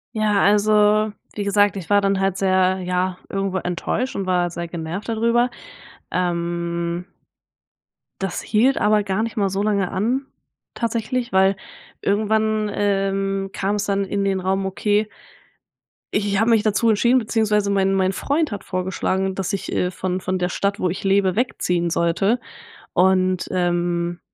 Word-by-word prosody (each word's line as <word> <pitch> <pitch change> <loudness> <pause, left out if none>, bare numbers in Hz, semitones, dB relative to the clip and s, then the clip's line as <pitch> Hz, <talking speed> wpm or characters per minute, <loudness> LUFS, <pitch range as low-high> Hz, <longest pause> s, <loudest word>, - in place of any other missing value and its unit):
Ja, 210 -2 +2
also 210 +1 +4 0.2
wie 205 - -3
gesagt, 205 0 +3
ich 190 -2 -7
war 205 0 +5
dann 195 -1 +1
halt 195 -1 0
sehr, 185 -1 +2
ja, 180 0 -1
irgendwo 195 -1 -1
enttäuscht 185 +8 -2
und 195 -1 -3
war 175 -1 +1
sehr 170 0 -5
genervt 170 +6 -5
da 225 - 0
drüber, 235 +2 +2 0.6
ähm 170 0 -2 1.2
das 190 -2 -3
hielt 245 +5 +2
aber 210 0 +3
gar 195 +2 -1
nicht 230 -1 -5
mal 200 -2 +2
so 195 +2 -1
lange 200 -3 0
an 240 +8 0 0.5
tatsächlich, 235 +1 -2
weil 190 +1 +4 0.5
irgendwann, 215 +1 +1
ähm, 195 -1 0
kam's 205 +1 -1
dann 200 0 0
in 200 +1 -2
den 195 -1 0
Raum, 190 +1 -1
okay 205 +3 0 1.1
i - - +3
ich 200 -1 0
habe 225 +1 +3
mich 225 -2 +4
dazu 220 +1 +2
entschieden 240 +4 +4
beziehungsweise 210 -3 +1
mein 195 -1 +2
mein 190 0 +1
Freund 295 - 0
hat 205 - -5
vorgeschlagen, 190 +1 -1
dass 190 -2 -2
ich, 195 - -3
äh, 180 - 0
von 185 0 -3
von 185 0 -1
der 180 +1 0
Stadt, 200 +3 -1
wo 180 - +1
ich 180 - -5
lebe, 195 -1 +2
wegziehen 180 -7 0
sollte 195 +8 +1 0.6
und, 185 0 +2
ähm 175 -1 0
195 Hz, 160 wpm, -21 LUFS, 185-210 Hz, 1.2 s, war